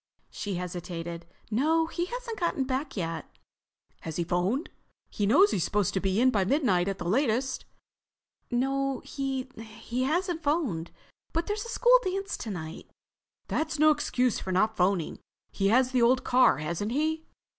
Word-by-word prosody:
She 200 -2 -4
hesitated. 170 -1 -5 0.2
"No, 315 +8 +3
he 345 +1 -2
hasn't 475 +1 -6
got 335 -6 0
back 260 0 -3
yet." 165 -3 -3 0.7
"Has 160 -2 -6
he 175 - 0
phoned? 180 - -1 0.4
He 205 - 0
knows 370 - +6
he's 175 - +1
supposed 205 -3 0
to 190 - +1
be 190 +2 0
in 255 +1 +5
by 200 -5 +2
midnight 195 - +2
at 195 -1 -2
the 175 - -5
latest." 260 +4 +1 0.8
"No, 270 +1 0
he—hasn't 265 - -3
phoned. 280 - 0 0.4
But 330 +1 0
there's 415 +2 -3
a - - -8
school - - +5
dance 390 +1 -2
tonight." 170 -8 -6 0.6
"That's 315 0 -1
no 310 +1 +6
excuse 255 -5 +1
for 190 - -5
not 215 +4 +2
phoning. 180 -3 +1 0.3
He 195 - 0
has 250 +4 +4
the 255 -2 +2
old 250 +2 +4
car, 250 - +4
hasn't 170 - -3
he?" 315 +3 -1
250 Hz, 155 wpm, -28 LUFS, 190-305 Hz, 0.8 s, knows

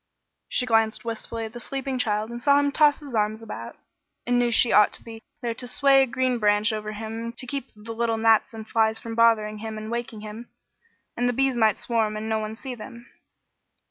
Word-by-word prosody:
She 250 - 0
glanced 225 -1 +1
wistfully 230 0 -4
at 220 - -9
the 240 - -7
sleeping 270 0 -4
child 215 -1 0
and 240 0 -6
saw 280 +1 +5
him 285 0 +1
toss 295 0 +4
his 280 -4 -9
arms 215 0 0
about, - - -7 0.5
and 245 0 +2
knew 240 -1 +2
she 235 +1 +3
ought 210 - +6
to - - -7
be 225 -1 -10 0.2
there 235 -1 -1
to 245 +2 -3
sway 275 +2 +5
a 265 - +3
green 255 -1 0
branch 210 +1 +2
over 215 0 -4
him 225 +2 -5
to 245 - -9
keep 270 0 -4
the 215 +2 -9
little 230 0 0
gnats 225 -1 +3
and 220 -1 -8
flies 220 -1 +2
from 230 0 -7
bothering 220 -2 +3
him 220 0 -6
and 215 +1 -6
waking 235 -2 -4
him; 215 +3 -9 0.7
and 245 0 +1
the - - 0
bees 270 +1 +1
might 220 -3 +3
swarm 220 -3 -1
and 215 +1 -5
no 220 0 0
one 215 0 -5
see 260 +3 -7
them. 235 +1 -10
230 Hz, 220 wpm, -25 LUFS, 220-245 Hz, 0.7 s, ought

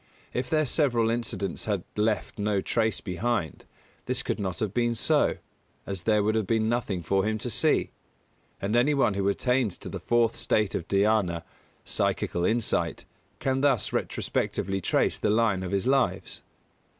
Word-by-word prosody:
If 125 0 -2
their 155 -1 +2
several 120 -6 +2
incidents 100 -6 -2
had 100 -5 -1
left 105 0 -1
no 105 -1 +1
trace 110 +2 0
behind, 100 -1 -2 0.4
this - - 0
could - - -2
not 95 -4 -3
have 105 -3 -2
been 120 +1 +1
so, - - +2 0.5
as 95 -3 -4
there 105 +2 +2
would 110 +1 +2
have 110 -3 0
been 110 0 +1
nothing 110 -6 -1
for 95 +4 +1
him 110 +1 0
to - - -3
see. - - +2 0.7
And 105 +3 -1
any 135 +5 +3
one 120 -7 +3
who 100 0 0
attains 125 0 0
to - - -8
the - - -5
fourth 120 -1 +2
state 105 -3 +1
of 85 - -3
Dhyāna 100 -4 +2 0.4
(psychical 85 - 0
insight) 115 +3 0 0.3
can 135 0 0
thus 135 -7 +2
retrospectively 95 0 -1
trace - - +1
the - - +1
line 105 -3 +2
of 95 - -4
his 100 -1 0
lives. 135 -1 0
110 Hz, 165 wpm, -27 LUFS, 100-120 Hz, 0.7 s, any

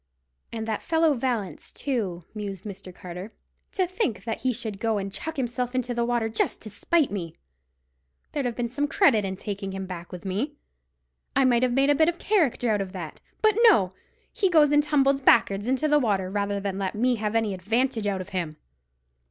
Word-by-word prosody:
"And 225 -1 -4
that 220 -2 -2
fellow 320 -2 +3
Vallance, 235 -7 -2
too," 205 - -3
mused 200 -4 -5
Mr. 195 -2 -8
Carter, 180 +4 -8 0.4
"to 375 - +2
think 360 - -2
that 225 -2 -3
he 255 - +2
should 220 -4 -5
go 225 -1 +1
and 195 -1 -4
chuck 320 -1 -5
himself 250 -1 -2
into 250 -1 0
the 235 0 0
water 235 -1 +1
just 220 0 -1
to 215 - -7
spite 315 - +1
me! 170 -5 -4 1.0
There'd 280 -4 -1
have 240 - -3
been 240 -1 -1
some 285 +5 -1
credit 260 - +4
in 190 0 -3
taking 195 -1 -5
him 190 0 -4
back 175 -2 -8
with 180 +1 -8
me. 210 +11 -2 0.8
I 270 0 +4
might 240 -2 +4
have 255 -1 +2
made 275 +2 +4
a - - +6
bit 315 +3 +4
of 345 - -3
character 315 - +1
out 205 -2 +1
of 190 -1 -5
that. 170 -5 -7 0.2
But, 435 -1 +4
no! 190 - +3 0.4
he 390 - +2
goes 305 -4 +5
and 295 0 +5
tumbles 275 -2 +2
back'ards 205 -4 +4
into 265 +4 +1
the 295 0 +4
water, 195 -7 0
rather 200 0 -1
than 195 -1 -3
let 195 0 -2
me 245 +3 +2
have 210 0 -2
any 220 -3 +1
advantage 225 +4 0
out 195 -2 -1
of 185 - -8
him." 170 -6 -3
225 Hz, 205 wpm, -26 LUFS, 195-270 Hz, 1.0 s, a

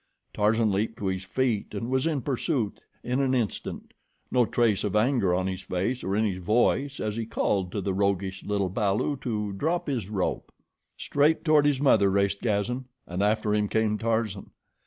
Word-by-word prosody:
Tarzan 110 +1 +2
leaped 105 +3 -1
to 105 - -5
his 95 0 -1
feet 110 +1 -1
and 115 +3 -3
was 130 +4 +2
in 150 -5 0
pursuit 130 - -1 0.2
in 125 +2 -1
an 130 -1 +2
instant, 115 -5 -3 0.4
no 125 -3 +3
trace 110 -4 +2
of 105 -1 -1
anger 110 -3 +3
on 90 0 0
his 95 0 -3
face 95 +7 -2
or 95 +1 -1
in 110 +1 +2
his 95 -3 -3
voice 125 +7 +1
as 105 0 -2
he 115 -1 -3
called 95 -5 0
to 100 - -2
the 95 0 -1
roguish 95 -1 -1
little 100 -2 -1
balu 105 +7 0
to 105 -5 -2
drop 170 - -1
his 120 -9 -2
rope. 100 -4 -2 0.5
Straight 150 +4 +1
toward 150 -2 +5
his 140 -3 +2
mother 110 -8 +5
raced 100 +1 +1
Gazan, 120 +4 -1 0.2
and 90 +2 -4
after 105 +1 +1
him 105 0 +1
came 110 0 0
Tarzan. 110 -3 -1
105 Hz, 185 wpm, -27 LUFS, 100-125 Hz, 0.5 s, toward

